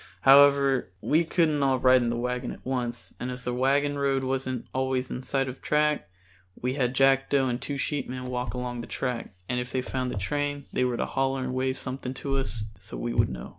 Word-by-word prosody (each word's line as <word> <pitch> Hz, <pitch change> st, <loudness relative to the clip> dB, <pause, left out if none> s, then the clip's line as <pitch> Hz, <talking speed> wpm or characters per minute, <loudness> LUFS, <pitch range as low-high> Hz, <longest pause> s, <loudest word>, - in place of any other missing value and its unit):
However, 140 Hz, 0 st, +7 dB
as -, -, -8 dB, 0.3 s
we 160 Hz, +3 st, +5 dB
couldn't 160 Hz, -3 st, +2 dB
all 135 Hz, -1 st, +3 dB
ride 130 Hz, 0 st, +5 dB
in 120 Hz, -, 0 dB
the 120 Hz, -, -1 dB
wagon 125 Hz, +1 st, -2 dB
at -, -, -11 dB
once 125 Hz, -2 st, -3 dB
and 125 Hz, -, -3 dB
as 125 Hz, 0 st, -6 dB
the 125 Hz, -, -2 dB
wagon 140 Hz, +3 st, +2 dB
road 135 Hz, -1 st, +1 dB
wasn't 130 Hz, -2 st, -2 dB
always 130 Hz, -1 st, -1 dB
in 125 Hz, -, -4 dB
sight 135 Hz, +1 st, 0 dB
of 130 Hz, 0 st, -5 dB
the -, -, -30 dB
track, 150 Hz, -9 st, +1 dB, 0.5 s
we 125 Hz, +1 st, -1 dB
had 130 Hz, -2 st, 0 dB
Jackdo 135 Hz, 0 st, +4 dB
and 120 Hz, -1 st, -1 dB
the -, -, -9 dB
two 145 Hz, -, -3 dB
sheepmen 130 Hz, -3 st, -3 dB
walk 125 Hz, 0 st, -3 dB
along 125 Hz, -1 st, -3 dB
the -, -, -8 dB
track, 125 Hz, -6 st, -3 dB
and 125 Hz, 0 st, 0 dB
if 125 Hz, +1 st, -4 dB
they 130 Hz, -1 st, -1 dB
found 130 Hz, 0 st, -2 dB
the 110 Hz, -, -4 dB
train 145 Hz, +6 st, -2 dB
they 125 Hz, -, +2 dB
were 125 Hz, -1 st, 0 dB
to -, -, 0 dB
holler 135 Hz, 0 st, 0 dB
and 130 Hz, 0 st, -3 dB
wave 130 Hz, 0 st, 0 dB
something 130 Hz, 0 st, -5 dB
to 135 Hz, 0 st, -1 dB
us 115 Hz, -5 st, -3 dB, 0.2 s
so 100 Hz, +3 st, -9 dB
we 120 Hz, 0 st, -2 dB
would 115 Hz, -1 st, +3 dB
know. 60 Hz, -1 st, -7 dB
130 Hz, 235 wpm, -27 LUFS, 125-135 Hz, 0.5 s, However